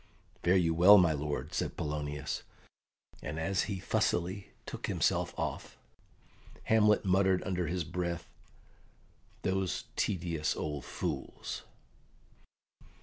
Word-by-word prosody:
"Fare 90 +2 +4
you 85 -3 +3
well, 90 +5 +9
my 85 -4 +5
lord," 75 0 -3
said - - -2
Polonius; 75 -1 -3 0.8
and 75 +2 -4
as 95 +4 +1
he 100 - -2
fussily 95 +1 0 0.2
took - - -5
himself - - +1
off, - - -4 0.9
Hamlet 105 -2 +4
muttered 95 0 +3
under 90 -2 -1
his 90 +2 -1
breath, 85 +1 -3 1.2
"Those 95 -1 0
tedious 85 -4 0
old 75 -4 -4
fools!" - - -4
90 Hz, 105 wpm, -32 LUFS, 80-95 Hz, 1.2 s, well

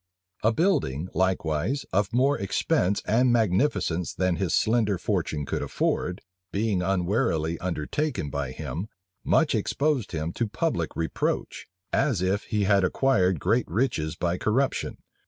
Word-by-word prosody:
A 110 - +3
building, 95 - 0
likewise, 95 - 0
of 100 +1 +1
more 135 +4 +3
expense 100 -1 0
and 120 +3 +3
magnificence 100 - +1
than 90 -2 +1
his 95 -4 -1
slender 110 -3 +2
fortune 85 -6 -1
could - - -2
afford, 90 0 -1 0.3
being 100 -2 0
unwarily 90 -3 0
undertaken 90 - -2
by 70 -3 -2
him, 85 +8 -5 0.4
much - - +3
exposed 145 -6 0
him 80 0 -3
to 115 - -1
public 110 - -2
reproach, 80 -1 -2 0.3
as 135 - +2
if 95 +3 0
he 105 -2 0
had 100 -1 +4
acquired 95 - +2
great - - +1
riches 85 -6 0
by 85 +1 -1
corruption. 130 +6 0
95 Hz, 135 wpm, -26 LUFS, 85-115 Hz, 0.4 s, had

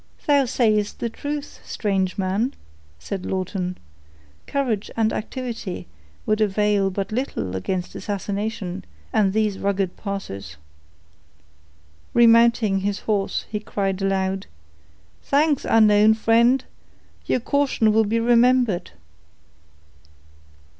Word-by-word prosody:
_" - - -25
"Thou 285 -2 +4
sayest 215 -4 +1
the 235 - -2
truth, 290 +3 -5
strange 195 -3 -1
man," 200 +7 -1 0.4
said 185 - -5
Lawton. 185 -1 -3 0.7
"Courage 245 -8 -1
and 220 -1 +2
activity 230 -5 -5 0.4
would 215 0 +1
avail 205 -1 +2
but 195 +1 -4
little 215 - -3
against 180 - -3
assassination 200 -2 -4 0.3
and 210 -3 +3
these 210 -1 0
rugged 195 -2 -1
passes." 100 - -6 1.6
Remounting 230 -3 +5
his 200 +1 -2
horse, 205 -3 -1
he 210 - -2
cried 195 -2 -2
aloud, 195 0 -1 0.7
"Thanks, 290 0 +1
unknown 215 -1 +5
friend; 235 +4 +3 0.6
your - - +2
caution 265 -4 +1
will 220 0 +4
be 225 +3 0
remembered." 240 -4 +3
210 Hz, 105 wpm, -23 LUFS, 195-230 Hz, 1.6 s, Remounting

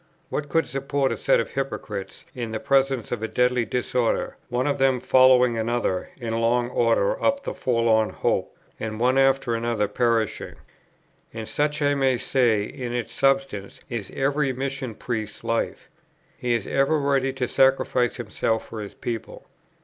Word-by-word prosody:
What 145 -1 -3
could 165 +3 +2
support 135 0 -1
a - - -1
set - - +2
of 115 - -2
hypocrites 105 -8 -5
in 120 -3 -4
the 110 - -3
presence 135 -2 +1
of 120 - -2
a 110 - -1
deadly 125 0 +1
disorder, 125 +1 -1
one 125 +1 0
of 145 -1 0
them 135 -1 +3
following 125 -2 +5
another 115 -5 -1
in 115 -3 -3
long 120 +1 +1
order 115 -5 +1
up 280 0 +2
the - - -4
forlorn 115 -3 +2
hope, - - -1 0.2
and 110 -1 -4
one 130 +3 +3
after 135 -2 +3
another 115 -2 0
perishing? 115 0 0 0.8
And 110 -1 -5
such, 150 0 0
I 145 0 +3
may 135 -2 +2
say, 120 -4 +2
in 125 +2 -6
its 120 -1 -3
substance, 135 -7 0
is 115 -5 -4
every 140 +1 +1
Mission 130 -2 -4
Priest's 110 -3 -4
life. 115 0 -2 0.5
He 120 -1 0
is 115 - -2
ever 140 +3 +2
ready 135 -1 +1
to 130 -2 -2
sacrifice 130 -2 +2
himself 110 -1 -2
for 110 - -6
his 100 - -8
people. 115 -2 -6
125 Hz, 165 wpm, -24 LUFS, 115-135 Hz, 0.8 s, following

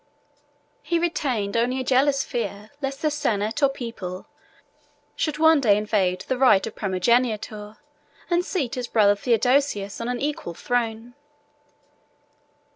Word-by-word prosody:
He 340 - 0
retained 260 -12 -1
only 245 +3 +1
a - - -2
jealous 275 +2 +2
fear 210 -2 -5
lest 275 +1 -4
the 305 - +2
senate 225 -4 -1
or 280 - +5
people 230 -9 -7 0.9
should 305 -2 -2
one 320 -1 +5
day 205 -5 +4
invade 200 -4 0
the 260 -1 -3
right 250 -8 +5
of 225 - -6
primogeniture, 215 +1 0 0.5
and 350 0 +1
seat 295 -11 -2
his 250 -1 -3
brother 205 -3 +4
Theodosius 235 -2 +1
on 230 - -3
an 250 -1 -2
equal 285 - -3
throne. 235 0 -2
240 Hz, 130 wpm, -24 LUFS, 210-275 Hz, 0.9 s, or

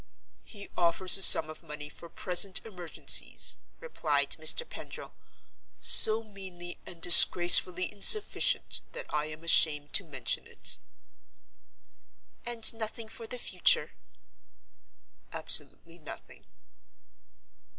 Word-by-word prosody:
"He 200 -3 -15
offers 175 +1 0
a 195 - -1
sum 160 -4 +5
of 155 - -14
money 150 -2 -11
for 165 +3 -16
present 185 +2 -2
emergencies," 180 -6 -2 0.2
replied 485 0 -4
Mr. 480 - +1
Pendril, - - -13 0.7
"so 220 +1 +4
meanly 190 -4 -13
and 170 - -12
disgracefully 175 +1 +5
insufficient 210 - 0
that - - -11
I 150 0 -4
am 155 +1 -13
ashamed 150 -3 0
to - - 0
mention 135 -7 -6
it." - - -4 1.7
"And 230 -2 +1
nothing 225 0 -9
for 225 0 -12
the 250 - -10
future?" 475 - +1 1.4
"Absolutely 170 +1 -6
nothing." 155 - -14
180 Hz, 105 wpm, -26 LUFS, 165-220 Hz, 1.7 s, sum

